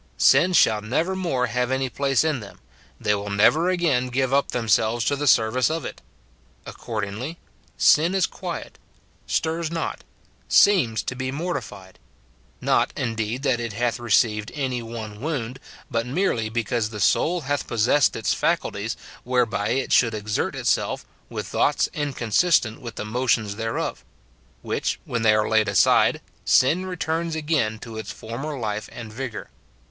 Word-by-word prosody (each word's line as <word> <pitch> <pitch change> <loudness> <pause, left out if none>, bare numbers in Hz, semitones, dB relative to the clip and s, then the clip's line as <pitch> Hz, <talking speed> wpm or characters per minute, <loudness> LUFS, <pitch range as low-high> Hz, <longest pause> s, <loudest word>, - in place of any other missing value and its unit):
Sin 185 - +5
shall 110 -11 +4
never 160 - -1
more 165 -10 0
have 125 0 -1
any 130 0 0
place 135 +1 +1
in 155 -5 0
them; 105 -3 -12 0.4
they 105 -3 +1
will 100 0 -3
never 145 - +4
again 165 -9 +1
give 130 +1 0
up 140 0 +2
themselves 115 -1 +1
to 140 - +2
the 145 +1 -2
service 120 +2 +4
of 160 0 -3
it. - - -7 0.6
Accord 110 -3 -5
ingly, 115 +11 -5 0.4
sin 165 +5 +4
is 190 -3 +3
quiet, - - -7 0.5
stirs 165 0 -1
not, 165 0 -4 0.4
seems 155 - +4
to - - -3
be 130 0 -3
mortified; 135 - -5 0.6
not, - - +2
indeed, 115 +1 -2
that 130 -4 +2
it 115 -3 -4
hath 120 +2 -1
received 105 -2 +1
any 130 -4 -2
one 110 -2 -7
wound, 135 -5 -3 0.3
but 115 +1 -1
merely 125 - 0
because 115 -1 -1
the 105 -1 -7
soul 170 - +2
hath 145 0 -2
possessed 120 +5 +3
its - - 0
faculties, - - -1 0.3
whereby 120 -5 0
it 130 +2 0
should 115 -3 +4
exert 105 0 -2
itself, - - 0 0.2
with - - -5
thoughts - - +1
inconsistent 135 - +1
with 120 -2 -7
the - - -5
motions 110 -2 0
thereof; 115 +1 -3 0.6
which, - - -2
when 115 - -2
they 110 -1 +5
are 105 0 +1
laid 110 -1 +3
aside, 100 - +4 0.2
sin 170 +9 +3
returns 165 -2 -2
again 150 -9 0
to 110 0 -8
its 110 - -7
former 135 +7 -6
life 105 -3 -3
and 115 -3 -9
vigour. 125 -1 -6
125 Hz, 155 wpm, -24 LUFS, 110-145 Hz, 0.6 s, Sin